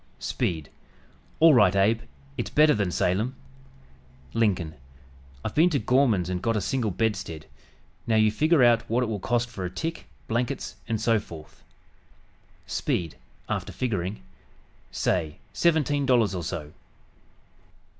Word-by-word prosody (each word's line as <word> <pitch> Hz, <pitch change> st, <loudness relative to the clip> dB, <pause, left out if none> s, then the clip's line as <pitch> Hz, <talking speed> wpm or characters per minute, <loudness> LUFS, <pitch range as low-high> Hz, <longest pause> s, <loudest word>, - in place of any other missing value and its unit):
Speed 80 Hz, -4 st, -3 dB, 0.7 s
"All 160 Hz, 0 st, +7 dB
right, 105 Hz, -6 st, +5 dB
Abe; 110 Hz, +4 st, +3 dB, 0.3 s
it's 120 Hz, -, -3 dB
better 150 Hz, 0 st, +5 dB
than 100 Hz, -4 st, 0 dB
Salem." 105 Hz, +9 st, 0 dB, 1.0 s
Lincoln 95 Hz, -8 st, +1 dB, 0.7 s
"I've -, -, -3 dB
been 165 Hz, +4 st, +5 dB
to 155 Hz, -, +1 dB
Gorman's 115 Hz, -6 st, +2 dB
and 90 Hz, -1 st, -3 dB
got 115 Hz, -1 st, 0 dB
a -, -, +2 dB
single 115 Hz, +3 st, -1 dB
bedstead; 95 Hz, -6 st, -2 dB, 0.6 s
now 115 Hz, -, +2 dB
you 110 Hz, -1 st, +4 dB
figure 155 Hz, +4 st, +3 dB
out 120 Hz, -1 st, +5 dB
what 120 Hz, +3 st, +2 dB
it -, -, +1 dB
will 110 Hz, -3 st, -3 dB
cost 120 Hz, +4 st, 0 dB
for 110 Hz, -6 st, -7 dB
a 90 Hz, -, -2 dB
tick, 165 Hz, -, -5 dB, 0.2 s
blankets 125 Hz, +4 st, -2 dB
and 115 Hz, -2 st, -1 dB
so 115 Hz, 0 st, +2 dB
forth." 80 Hz, -6 st, -12 dB, 1.0 s
Speed 80 Hz, -7 st, -2 dB, 0.3 s
(after -, -, -3 dB
figuring) 100 Hz, -5 st, -3 dB, 0.7 s
"Say, 80 Hz, -5 st, -1 dB, 0.2 s
seventeen 150 Hz, -4 st, +2 dB
dollars 120 Hz, -6 st, +3 dB
or 90 Hz, -, -3 dB
so." 80 Hz, -3 st, -5 dB
110 Hz, 135 wpm, -26 LUFS, 95-125 Hz, 1.0 s, All